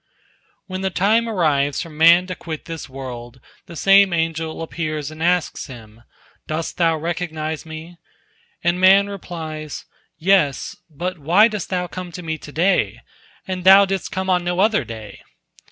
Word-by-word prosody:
When 185 -1 -5
the 190 - 0
time 220 +5 +2
arrives 145 -8 +1
for 165 - -11
man 170 +4 +5
to 185 - -5
quit 160 -3 -7
this 165 -3 -7
world, 125 -2 -8 0.3
the 170 - -10
same 195 +2 +5
angel 165 -1 -2
appears 155 -3 -4
and 155 0 -11
asks 175 0 0
him, 115 -4 -13 0.5
"Dost 155 +1 -4
thou 165 -2 +2
recognize 160 -1 -4
me?" 160 +2 -9 0.7
And 175 +1 +1
man 195 +2 +6
replies, 160 -6 -7 0.3
"Yes; 165 -6 +2
but 175 +3 -5
why 175 +10 +5
dost 210 -5 -5
thou 180 -1 -1
come 180 0 -7
to 180 - -7
me 160 -1 -4
to 145 - -11
day, 180 +6 +1 0.5
and 185 -1 -4
thou 195 +2 +8
didst 195 0 -3
come 190 0 -3
on 180 -1 +2
no 175 +1 -2
other 210 +1 +3
day?" 110 -2 -9
170 Hz, 160 wpm, -21 LUFS, 155-185 Hz, 0.7 s, thou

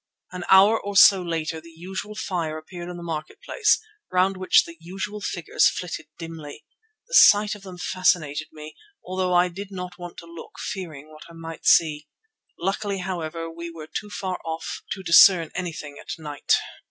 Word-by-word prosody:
An 180 -1 -6
hour 200 +4 +6
or 200 -1 -3
so 195 -1 +8
later 165 -2 -3
the 165 - -14
usual 190 +5 -7
fire 165 -6 -3
appeared 175 +2 -9
in 175 - -7
the 175 - -8
marketplace, 170 - 0 0.3
round 185 +1 +2
which 185 0 +4
the 170 - -10
usual 195 +5 -6
figures 175 -4 +2
flitted 170 -3 -6
dimly. 165 -3 -9 0.4
The - - -14
sight 210 - +7
of 210 - -10
them 185 -2 -10
fascinated 165 -5 0
me, 155 0 -10 0.3
although 185 0 -1
I 175 +1 +5
did 195 +3 -7
not 180 -2 -7
want 175 -1 -9
to - - -9
look, 170 -1 -12
fearing 155 -6 -6
what 155 0 -13
I - - -13
might 165 0 -8
see. 150 -2 +4 0.5
Luckily, 195 +2 -2
however, 170 -3 -4
we 170 +1 -7
were 165 -2 -9
too 210 - -3
far 190 -3 -4
off 160 0 -5
to 190 - -9
discern 170 -1 +7
anything 160 -5 -5
at - - -17
night. 150 -3 0
175 Hz, 175 wpm, -24 LUFS, 165-190 Hz, 0.5 s, so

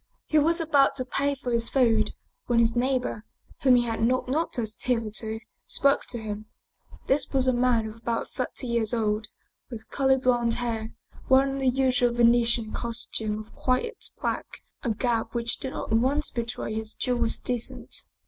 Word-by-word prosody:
He 310 - +3
was 330 +4 +3
about 290 -4 +3
to 255 - -2
pay 280 +2 0
for 255 -2 -5
his 230 -1 +1
food 225 -5 +3 0.3
when 240 - +2
his 230 0 +4
neighbor, 250 -3 0 0.4
whom 260 -2 +6
he 245 - +4
had 225 -2 -3
not 255 +3 +1
noticed 250 -6 -1
hitherto, 220 -2 -1 0.3
spoke 280 0 +2
to 240 - -5
him. 215 -1 -6 0.6
This 270 +1 +2
was 265 -2 +3
a 255 - +4
man 240 -2 +2
of 215 +1 -9
about 230 0 -2
thirty 255 0 -4
years 235 -1 +1
old, 215 -1 0 0.4
with 225 -3 -9
curly 265 -1 +3
blond 245 -2 +2
hair, 230 -2 -3 0.3
wearing 270 +1 +4
the 265 -1 +3
usual 250 -2 +2
Venetian 235 -1 +3
costume 225 -2 -3
of 215 0 -10
quiet 260 - 0
black, - - -4 0.2
a 245 - -2
garb 230 +1 -1
which 235 -1 0
did 265 - -4
not - - -5
at 225 - +4
once 280 +5 +1
betray 235 -2 -3
his 220 0 -4
Jewish 240 -2 0
descent. 245 -2 -4
240 Hz, 170 wpm, -26 LUFS, 225-260 Hz, 0.6 s, whom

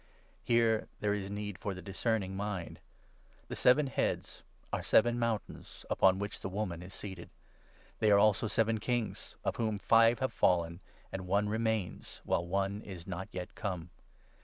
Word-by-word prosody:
(Here 115 -2 +3
9 - - -11
there 105 -1 +2
is 100 -1 -3
need 105 -1 -5
for 100 -2 -3
the 95 - -8
discerning 100 -1 -1
mind.) 95 -3 -4 0.7
The - - -4
seven 135 +4 +5
heads 135 - -2 0.3
are - - 0
seven 120 +2 +4
mountains 115 -3 -3
upon 95 0 +5
which 100 +1 -4
the - - -4
woman 95 -3 -3
is 90 +1 -9
seated. 95 -4 -8 0.7
They 110 - +4
are 100 - +7
10 - - +6
also 110 +1 +4
seven 110 0 +1
kings; 120 0 -2
of - - 0
whom 110 -2 0
five 115 +3 +5
have 130 - -1
fallen 85 -1 +2 0.3
and 95 -1 -5
one 100 +2 +2
remains, 110 -3 -2
while - - +1
one 100 +2 -1
is 90 -5 -8
not 95 0 -5
yet 90 -1 -6
come. 90 -5 -4
105 Hz, 170 wpm, -32 LUFS, 95-110 Hz, 0.7 s, are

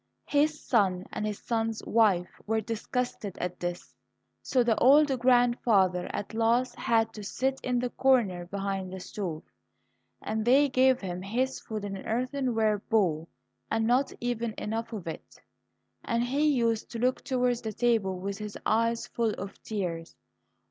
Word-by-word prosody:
His 300 +1 +1
son 190 -6 +2
and 215 - -2
his 210 -1 -3
son's 225 -1 -1
wife 200 -6 +2
were 225 +1 +1
disgusted 225 -1 -3
at 180 0 -4
this, 175 0 -5 0.5
so 255 -2 +2
the 235 -2 +2
old 290 +4 +6
grandfather 235 -7 +3
at 205 - -5
last 235 +2 +2
had 225 -1 +1
to 210 - -8
sit 265 +6 -1
in 250 -1 0
the 245 0 -1
corner 210 -10 +2
behind 195 -1 -3
the 190 - -6
stove, 180 -4 -5 0.8
and 220 0 -2
they 275 +5 +5
gave 260 0 +3
him 180 -2 -4
his 250 +7 -1
food 215 -2 -5
in 200 -1 -4
an 190 - -8
earthenware 235 -3 0
bowl, 175 -7 0 0.4
and 225 0 +1
not 250 +4 +2
even 235 -2 -2
enough 225 +2 -3
of 210 -6 -6
it. 165 - -8 0.6
And 235 0 0
he 280 +5 +1
used 230 -6 +1
to - - -3
look 250 +2 0
towards 250 -3 0
the 220 - -4
table 215 -5 +1
with 195 +2 -4
his 210 -1 -6
eyes 230 +1 +1
full 230 -2 -1
of 195 - -8
tears. 175 -6 -4
225 Hz, 160 wpm, -28 LUFS, 200-245 Hz, 0.8 s, old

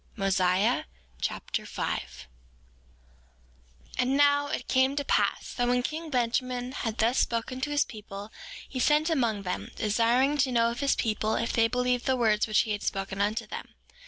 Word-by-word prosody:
Mosiah 195 +1 +2 0.4
Chapter - - -2
5 - - -2
5:1 65 0 -12 1.7
And 260 +2 +2
now, 285 0 +4
it 295 - -4
came 260 +1 +3
to 285 -1 -2
pass - - 0
that 245 -1 0
when 245 0 +2
king 315 +4 -4
Benjamin 250 -1 -1
had 225 -5 -3
thus 235 +4 +2
spoken 240 +2 -1
to 295 - -1
his 290 -1 +2
people, 210 -1 -9 0.4
he 260 - -5
sent 300 +5 +3
among 230 -9 0
them, 180 -1 -4
desiring 240 +7 +2
to 260 -1 +2
know 235 -1 +3
of 235 - -6
his 280 -1 +2
people 220 -1 0
if 230 - -1
they 225 -1 +4
believed 250 +1 0
the 260 -1 +2
words 215 -3 +2
which 215 - +4
he 220 - -3
had 205 -1 -2
spoken 195 0 -2
unto 210 +2 0
them. - - -8
240 Hz, 175 wpm, -28 LUFS, 215-265 Hz, 1.7 s, now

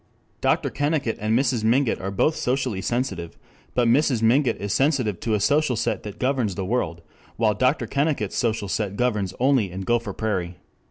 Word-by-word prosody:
Dr. - - +1
Kennicott 145 -5 -1
and 110 +2 +1
Mrs. 125 -4 +1
Mingott 120 +3 +2
are 95 - -3
both 125 +11 +1
socially 125 -6 -1
sensitive, 95 -8 -3 0.4
but 125 -1 +3
Mrs. 125 -1 +3
Mingott 120 +2 +3
is 100 0 -2
sensitive 130 - +1
to 110 -2 0
a - - 0
social 145 +5 +2
set 115 - -1
that 105 -2 -8
governs 125 -7 0
the 95 - -3
world, 90 -7 -2 0.3
while 110 -2 +2
Dr. 130 +7 +1
Kennicott's 140 -8 -1
social 110 -3 0
set 100 0 -2
governs 105 -7 0
only 130 -6 +3
in 90 +2 -6
Gopher 115 0 0
Prairie. 95 -5 -2
115 Hz, 175 wpm, -24 LUFS, 100-130 Hz, 0.4 s, but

